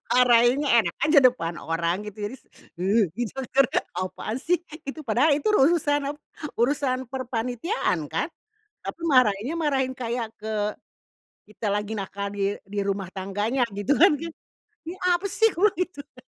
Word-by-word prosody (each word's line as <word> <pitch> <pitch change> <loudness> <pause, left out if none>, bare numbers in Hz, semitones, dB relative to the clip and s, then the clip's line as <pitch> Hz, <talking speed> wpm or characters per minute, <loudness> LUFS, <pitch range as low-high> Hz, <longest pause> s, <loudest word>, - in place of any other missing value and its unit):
Marahinnya 250 +3 +5
enak 170 -5 -3
aja 305 0 +6
depan 205 -10 +2
orang 170 +5 -1
gitu 210 0 -6
jadi 260 - -8
s - - -25 0.3
heh. 205 +5 +3
didenger, 260 +2 +1 0.3
"Apaan 185 +5 -3
sih?" 350 +3 +1 0.3
itu 310 +2 -5
padahal 255 +7 +3
itu 295 +8 -1
urusan 290 -3 +3
ap - - -18 0.4
urusan 260 +1 +1
perpanitiaan 245 - -2
kan? 295 - -1 0.6
Tapi - - -6
marahinnya, 255 -1 +3
marahin 265 -4 0
kayak 235 -2 -3
ke 215 -1 -2 0.9
kita 210 0 -4
lagi 210 +1 -2
nakal 200 0 -4
di 200 0 0
di 205 +1 -5
rumah 195 -2 -2
tangganya, 205 +6 -1
gitu 205 +8 +1
kan, 360 -1 +8 0.7
"Ini 340 - -5 0.2
apa 350 +3 0
sih?" 450 +4 +3
kubilang 390 +4 +3
gitu 365 -4 -2 0.2
kan - - -13
245 Hz, 145 wpm, -25 LUFS, 205-290 Hz, 0.9 s, kan